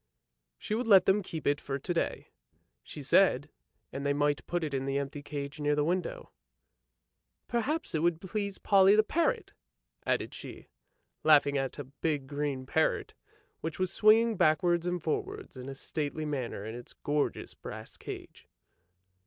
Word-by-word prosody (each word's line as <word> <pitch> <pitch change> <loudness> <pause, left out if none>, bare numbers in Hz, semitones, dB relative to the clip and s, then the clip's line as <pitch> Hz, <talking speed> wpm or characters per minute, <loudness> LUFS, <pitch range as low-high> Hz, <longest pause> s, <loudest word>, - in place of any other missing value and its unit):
She - - -4
would 230 +2 -1
let 195 -4 +7
them 195 +2 +4
keep 165 -4 -6
it 145 0 +2
for 135 -1 -3
to 160 +6 -2
day, 170 - -2 0.5
she - - -9
said, - - +4 0.4
and 140 - -4
they 140 0 +2
might 145 0 +1
put 175 -1 -1
it 150 -3 -3
in 135 0 -1
the 135 0 0
empty 140 +1 -3
cage 145 0 -6
near 145 0 +2
the 150 - +2
window; 175 +3 -2 0.6
" - - -54
Perhaps 285 +8 -1
it 155 - +1
would 170 -1 +2
please 200 +1 -3
Polly 200 +1 +5
parrot! 435 - 0 0.3
" - - -42
added - - 0
she, - - -10 0.5
laughing 145 -2 +5
at 135 -1 -1
a 145 - -4
big 140 +1 -2
green 140 -1 -3
parrot 160 +4 +1 0.5
which 160 -1 -4
was 185 -1 -1
swinging 220 0 +5
backwards 175 +2 +3
and 175 -2 -2
forwards 155 - -3
in 130 +1 -7
a 135 - -6
stately 150 +2 -3
manner 130 -8 -3
in 110 - -5
its 120 0 -9
gorgeous 145 0 -2
brass - - -9
cage. - - -9
150 Hz, 170 wpm, -30 LUFS, 140-185 Hz, 0.6 s, let